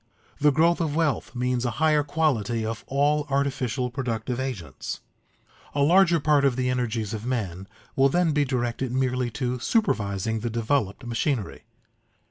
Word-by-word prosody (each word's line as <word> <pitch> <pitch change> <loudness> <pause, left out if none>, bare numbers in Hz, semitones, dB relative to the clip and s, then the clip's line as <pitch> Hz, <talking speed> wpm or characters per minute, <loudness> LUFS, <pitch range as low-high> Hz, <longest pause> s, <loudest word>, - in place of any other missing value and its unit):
The 150 0 +5
growth 165 +4 +3
of 155 -3 -1
wealth 155 -5 0
means 125 0 0
a 125 - +1
higher 155 -1 +3
quality 125 -7 0
of 115 0 -4
all 145 +2 +1
artificial 130 -3 -1
productive 125 -1 -3
agents. 95 - -5 0.8
A 140 - +3
larger 175 +2 +5
part 150 -1 +3
of 135 -3 +3
the 125 0 0
energies 115 -4 -2
of 110 -1 -4
men 100 -7 -3 0.3
will 135 +1 +4
then 175 +2 +2
be 145 0 +2
directed 125 -1 -2
merely 125 -1 0
to 125 -2 -1
supervising 110 - 0
the 120 +2 -3
developed 115 0 -1
machinery. 120 -2 -2
125 Hz, 150 wpm, -25 LUFS, 115-145 Hz, 0.8 s, The